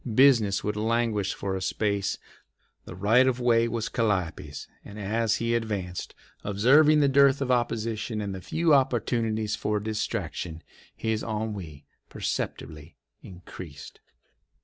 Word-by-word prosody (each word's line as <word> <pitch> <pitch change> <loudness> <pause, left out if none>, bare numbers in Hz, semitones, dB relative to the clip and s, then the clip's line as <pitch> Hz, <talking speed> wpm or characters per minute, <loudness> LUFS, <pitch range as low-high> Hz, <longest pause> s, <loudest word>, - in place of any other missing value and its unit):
Business 115 -7 +5
would 105 0 -2
languish 110 -2 0
for 95 -1 -3
a 95 - -4
space. 100 +1 -1 0.7
The - - -9
right 115 +7 +4
of 130 -1 +1
way 115 -1 +3
was 115 -1 -2
Calliope's, 90 -9 -2 0.2
and 105 +1 -10
as 110 +3 0
he 115 0 -1
advanced, 100 -6 -3 0.3
observing 145 +10 +5
the 140 - +4
dearth 140 0 +5
of 135 -2 -1
opposition 115 -2 -1
and 100 -2 -3
the 95 - -7
few 160 - +1
opportunities 115 -4 +1
for 105 -1 -1
distraction, 100 -6 -4 0.3
his 110 -1 -1
ennui 105 -9 -5 0.2
perceptibly 75 +1 -5 0.3
increased. 85 -5 -11
110 Hz, 125 wpm, -27 LUFS, 100-120 Hz, 0.7 s, Business